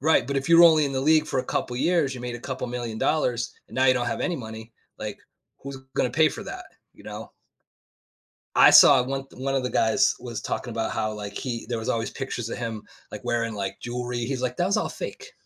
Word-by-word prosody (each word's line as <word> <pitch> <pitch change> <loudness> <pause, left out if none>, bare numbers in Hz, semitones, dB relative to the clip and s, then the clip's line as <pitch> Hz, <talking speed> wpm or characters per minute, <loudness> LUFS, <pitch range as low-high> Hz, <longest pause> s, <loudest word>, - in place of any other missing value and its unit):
Right, 160 +4 +3
but 140 - -2
if 135 +2 -2
you're 170 0 +8
only 155 -2 +6
in 140 - -2
the 130 - -1
league 155 +2 +4
for 135 - -1
a - - -1
couple 125 - -2
of 125 - -3
years, 165 -6 +2
you 125 - -8
made 125 -1 -5
a 120 - -7
couple 130 0 -4
million 120 -2 -5
dollars 125 -6 0 0.2
and - - -13
now 130 - +3
you 130 -1 +5
don't 120 -1 -1
have - - -2
any 175 - -1
money, 110 -1 -9 0.3
like, - - -5 0.4
who's 140 0 -7 0.2
gonna 125 - +1
pay 155 +5 +4
for - - -7
that? - - -7 0.3
You - - -18
know? - - -8 1.2
I - - +8
saw 130 - +8
one 135 +1 -3
one 135 +1 -3
of 135 - +1
the 125 - -2
guys 110 -1 +3
was 120 -3 -6
talking 120 - -4
about 115 0 -2
how, 110 -1 -1
like, 105 -1 -6
he 120 -3 -4
there 120 -2 -2
was 110 - -5
always 115 0 -1
pictures 120 -4 -5
of - - -4
him, 115 -3 -4 0.3
like, - - -8
wearing, 115 -1 -1
like, 100 -1 -4
jewelry. 125 0 -4
He's 130 -1 -3
like, 125 -1 -2
"That 175 - +2
was 200 - +1
all - - 0
fake." - - -7
125 Hz, 245 wpm, -25 LUFS, 115-135 Hz, 1.2 s, you're